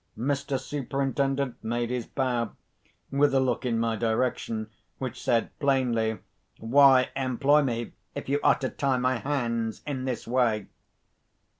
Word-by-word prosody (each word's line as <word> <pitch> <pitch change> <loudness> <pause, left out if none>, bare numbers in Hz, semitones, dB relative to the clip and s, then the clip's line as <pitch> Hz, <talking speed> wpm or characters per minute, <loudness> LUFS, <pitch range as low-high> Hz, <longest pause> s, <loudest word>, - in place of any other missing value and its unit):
Mr. 140 +2 -1
Superintendent 135 -1 -2
made 120 +1 -1
his 125 -2 -2
bow, 120 -5 -1 0.6
with 140 0 +3
a - - +5
look 130 -1 0
in 115 -2 +1
my 115 0 0
direction, 110 0 -1 0.3
which 130 -3 -5
said 115 -1 +1
plainly, 120 -6 +1 0.4
"Why 130 +2 +5
employ 135 +3 +3
me, 120 -4 -2 0.2
if - - -5
you 140 +2 +1
are - - +4
to 130 - -2
tie 135 -2 0
my 130 0 +1
hands 115 -5 -2
in 135 -3 -3
this 125 -4 -3
way?" 115 -4 +1
130 Hz, 140 wpm, -27 LUFS, 115-135 Hz, 0.6 s, a